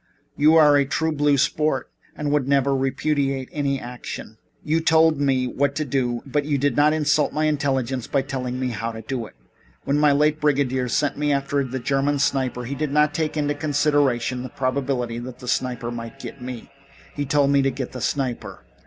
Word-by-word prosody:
You 155 +2 +5
are 150 -2 +6
a 140 - +4
true 160 +4 -1
blue 145 -1 +2
sport 150 0 0 0.2
and 150 -1 -2
would 145 -3 +1
never 140 0 +2
repudiate 135 0 -1
my 140 -2 0
action. 120 -3 -8 0.2
You 160 +2 +1
told 160 -2 +4
me 135 -2 +2
what 140 +3 -1
to 155 +1 -1
do, 125 -3 -1
but 145 +2 -1
you 145 -1 0
did 140 -2 +1
not 150 +1 +4
insult 150 -1 +1
my 155 +1 0
intelligence 135 -4 -1
by 135 - 0
telling 130 -2 -4
me 130 -1 -1
how 115 0 -3
to 110 0 -8
do 120 -1 -4
it. - - -19 0.5
When 145 +1 +1
my 150 -1 +5
late 150 +2 +2
brigadier 135 -3 +1
sent 145 +4 0
me 150 0 +1
after 140 0 0
the 130 0 -4
German 135 +3 0
sniper 130 -3 0
he 130 - -4
didn't 150 +1 +1
take 155 0 -2
into 145 -1 0
consideration 145 -5 +1
the 130 - -6
probability 130 -2 -2
that 125 0 -8
the 125 -1 -11
sniper 125 -1 -1
might 115 +2 -7
get 135 - -9
me. 125 -2 -7 0.4
He 145 - -2
told 140 0 +2
me 140 0 +4
to 135 - +2
get 130 -1 -5
the 125 - -7
sniper. 130 -3 -3
140 Hz, 195 wpm, -23 LUFS, 130-145 Hz, 0.5 s, are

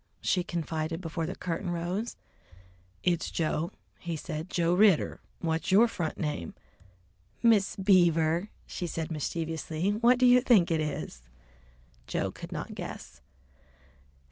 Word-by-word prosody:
she 180 - +1
confided 165 -1 -3
before 165 -2 -3
the - - -4
curtain 175 +1 -3
rose. 175 +7 -2 0.9
"It's 175 -2 +1
Joe," 165 0 -1 0.3
he 170 -1 -4
said, 155 +2 -5
"Joe 170 -2 +1
Ridder, 195 -3 +4 0.2
What's 165 +3 -1
your 215 +5 +7
front 170 -8 -3
name?" 150 - -3 0.9
"Miss 220 -4 +4
Beaver," 175 -2 +3 0.2
she 175 - -4
said 165 0 -4
mischievously. 160 +3 -2
"What 235 +4 +4
do 255 - +4
you 250 0 +7
think 210 -10 +4
it 160 -1 +2
is?" 140 - -4 0.9
Joe - - -1
could - - -10
not - - -5
guess. - - -8
170 Hz, 130 wpm, -29 LUFS, 160-195 Hz, 0.9 s, your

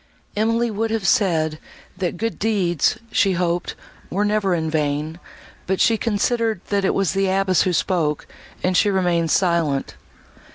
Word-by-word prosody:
Emily 230 +2 +1
would 225 +2 -1
have 220 -3 -2
said, 160 -7 +2 0.4
that 180 -2 -3
good 225 +4 -3
deeds, 190 -7 +1
she 195 -2 +3
hoped, 175 0 -1 0.3
were 200 +4 0
never 205 -4 +1
vain; 155 0 -2 0.5
but 190 0 0
she 230 - +4
considered 225 0 0
that 200 -1 +1
it 190 - +1
was 195 -3 +1
the 195 0 +1
abbess 190 -1 +2
who 185 - +1
spoke, 165 -4 0 0.4
and 185 0 +1
she 205 - +4
remained 175 -4 +1
silent. 170 -6 +1
190 Hz, 150 wpm, -21 LUFS, 170-210 Hz, 0.5 s, she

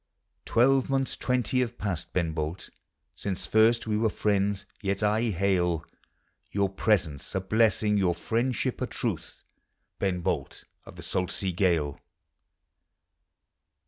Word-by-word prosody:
Twelvemonths 135 +2 +2
twenty 125 0 0
have 120 -1 -1
past. 95 -6 -3
Ben 85 -3 0
Bolt, 80 +3 -4 0.4
Since 95 -3 -3
Lirst 115 +2 +5
we 105 -1 0
were 110 0 +3
friends 100 -1 0
— - - -30
yet 100 0 -1
I 105 +3 +2
hail 90 -5 +1 0.6
Your 100 -1 +1
presence 95 -8 0
a - - +2
blessing, 105 +1 +2
your 90 -3 +2
friendship 115 +7 -1
a - - 0
truth, - - -4 0.6
Ben 95 -3 0
Bolt - - -2 0.2
of - - -11
the - - -9
salt 90 -1 -1
sea 95 +1 -1
gale. 85 -6 +1
100 Hz, 130 wpm, -28 LUFS, 90-110 Hz, 0.6 s, Lirst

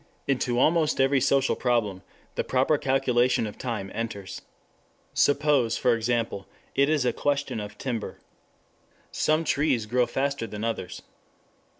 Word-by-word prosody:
6 - - -19
Into 125 -2 +1
almost 155 +3 +2
every 135 0 +3
social 135 +1 +2
problem 110 -7 0 0.3
the - - -1
proper 135 +3 +2
calculation 125 -3 +2
of 105 - -8
time 110 -6 -4
enters. 100 -4 -5 0.7
Suppose, 145 -5 +2
for 125 - +3
example, 115 -3 -2 0.3
it 140 +1 +3
is 150 -5 +1
a 125 - +2
question 145 -4 -1
of 105 0 -7
timber. 120 -5 -4 0.9
Some 155 +1 +1
trees 140 -8 +1
grow 125 +2 +1
faster 140 -3 -2
than 105 0 -6
others. 115 -6 -4
125 Hz, 135 wpm, -26 LUFS, 115-140 Hz, 0.9 s, every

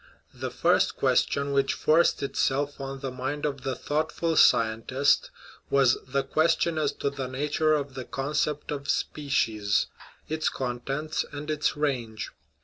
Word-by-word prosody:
The - - -4
first - - +2
question 140 0 +1
which 135 0 +2
forced 155 -2 +3
itself 140 +1 0
on 135 0 -6
the 135 -2 -3
mind 130 +4 -3
of 140 -3 -2
the 130 0 -2
thoughtful 155 +2 -1
sci 160 - +7 0.2
entist 130 +5 +1 0.4
was 135 -3 +4
the 135 +1 0
question 160 +3 +1
as 150 -2 +1
to 140 - -2
the 135 -2 -4
nature 150 +4 +1
of 140 -2 -3
the 130 -2 -6
concept 145 +3 -2
of 140 -1 -5
species, 110 -8 +1 0.4
its 155 0 0
contents, 135 +5 -3
and 145 +1 -5
its 150 0 0
range. 120 -7 -2
140 Hz, 145 wpm, -27 LUFS, 130-150 Hz, 0.4 s, sci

